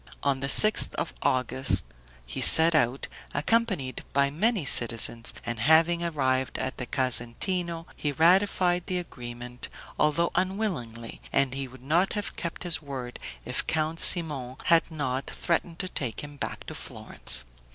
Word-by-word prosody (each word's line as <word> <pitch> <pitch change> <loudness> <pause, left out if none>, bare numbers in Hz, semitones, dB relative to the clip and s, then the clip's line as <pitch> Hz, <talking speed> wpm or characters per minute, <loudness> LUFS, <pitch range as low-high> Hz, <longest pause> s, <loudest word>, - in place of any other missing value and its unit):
On 140 -1 0
the 135 +1 -3
sixth 215 +7 +4
of - - -4
August 130 +1 0 0.4
he - - -4
set 165 +1 +7
out, 135 -3 +1 0.3
accompanied 150 - 0
by 140 0 +2
many 200 +2 +1
citizens, 115 -2 +5
and 120 -1 -4
having 160 +6 +3
arrived 130 -5 -1
at 130 - -4
the 125 - -6
Casentino 165 +8 -1
he 145 - -2
ratified 180 +2 +2
the 185 - -1
agreement, 120 -6 -7 0.3
although 150 +3 +1
unwillingly, 180 - -3
and 135 -2 +1 0.2
would 130 0 -15
not 170 +7 +1
have 205 -1 -4
kept 170 0 -5
his 175 -3 0
word 130 -4 -7 0.3
if - - -2
Count 160 +1 -1
Simon 145 -8 +4
had 165 -1 +3
not 135 -4 -3
threatened 170 0 -2
to 185 - -2
take 130 -9 -4
him 145 0 -9
back - - -6
to - - -8
Florence. - - -4
145 Hz, 145 wpm, -26 LUFS, 130-170 Hz, 0.4 s, set